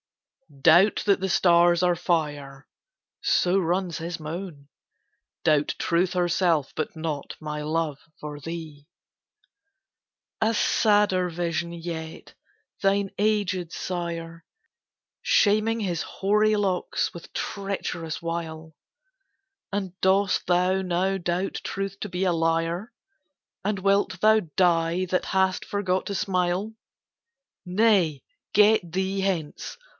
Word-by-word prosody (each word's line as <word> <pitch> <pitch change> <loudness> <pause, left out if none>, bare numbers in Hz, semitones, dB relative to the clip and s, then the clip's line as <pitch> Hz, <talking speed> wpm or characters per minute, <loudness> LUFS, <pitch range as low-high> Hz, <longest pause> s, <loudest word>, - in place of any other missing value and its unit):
"Doubt 175 +6 +5
that 200 -2 +3
the 190 - -1
stars 175 -1 +4
are 180 -1 +3
fire," 145 -5 -2 0.5
so 180 +2 +2
runs 180 -1 -1
his 165 +1 -5
moan, 155 -2 -7 0.8
"Doubt 150 -2 +2
Truth 175 +2 +1
herself, 175 -4 +1
but 155 - -3
not 155 -3 -5
my 150 -1 -5
love 155 -1 -1 0.2
for 150 -1 -7
thee!" 155 -2 -8 1.5
A 220 +1 +3
sadder 205 -4 +2
vision 170 0 -2
yet: 165 -1 -7 0.5
thine 195 -1 +1
aged 200 -5 0
sire 170 -2 -5 0.8
Shaming 215 +2 +3
his 180 -5 -2
hoary 210 +3 +1
locks 190 -3 -1
with 170 - -11
treacherous 185 -5 -4
wile! 160 -2 -5 1.0
And 195 -3 -3
dost 190 +1 +2
thou 180 +2 +2
now 185 +1 0
doubt 175 +1 -2
Truth 195 0 -4
to 210 - -4
be 185 +1 -1
a 180 - +2
liar? 165 +5 0 0.7
And 200 0 -1
wilt 195 -1 +1
thou 215 +2 +5 0.2
die, 175 0 +2
that 185 0 -1
hast 190 -1 +1
forgot 190 -2 -1
to 200 - -3
smile? 185 +2 -1 0.9
Nay, 180 - +2 0.3
get 215 +1 +5
thee 190 +2 -1
hence! 175 -6 -3
180 Hz, 110 wpm, -25 LUFS, 165-195 Hz, 1.5 s, Doubt